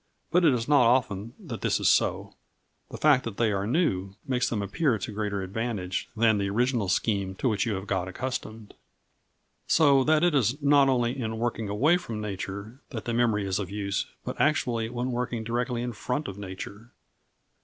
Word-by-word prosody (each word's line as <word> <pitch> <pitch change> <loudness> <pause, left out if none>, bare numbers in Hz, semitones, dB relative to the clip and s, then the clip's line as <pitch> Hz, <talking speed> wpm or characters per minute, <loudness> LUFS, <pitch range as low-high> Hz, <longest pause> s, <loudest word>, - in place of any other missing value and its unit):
But 180 +1 +4
it 150 -6 +5
is 115 -1 -3
not 140 -5 +5
often 115 -3 +1
that 150 - -8
this - - +1
is - - +1
so; - - +2 0.6
the - - -7
fact 145 -4 +4
that 115 -4 -6
they 115 -2 +2
are 100 0 -1
new 100 - 0
makes 125 -2 +1
them 105 -3 -1
appear 115 - +1
to 110 - -5
greater 105 -2 -2
advantage 95 -2 -3
than 110 -2 +4
the 100 0 -1
original 120 -1 +1
scheme 100 0 0
to 130 - -1
which 110 +1 +1
you 110 - 0
have 95 +1 -5
got 95 -3 -1
accustomed. 110 0 -5 0.9
So 140 -4 +5
that 155 +1 +3
it 175 -2 +4
is 135 0 +2
not 140 -1 +5
only 120 -1 +1
in 110 -2 -3
working 115 -2 -2
away 145 +12 +3
from 115 -11 -6
nature 100 +3 -6
that 115 -5 -6
the 120 - -2
memory 115 -4 +2
is 95 0 -1
of 95 -3 -4
use, 100 -1 -2 0.2
but - - -3
actually 120 -7 +1
when 125 +1 -3
working 120 -2 -2
directly 120 +1 -2
in 120 -1 -3
front 125 +7 -3
of 95 - -6
nature. 100 +3 -8
115 Hz, 195 wpm, -27 LUFS, 100-130 Hz, 0.9 s, it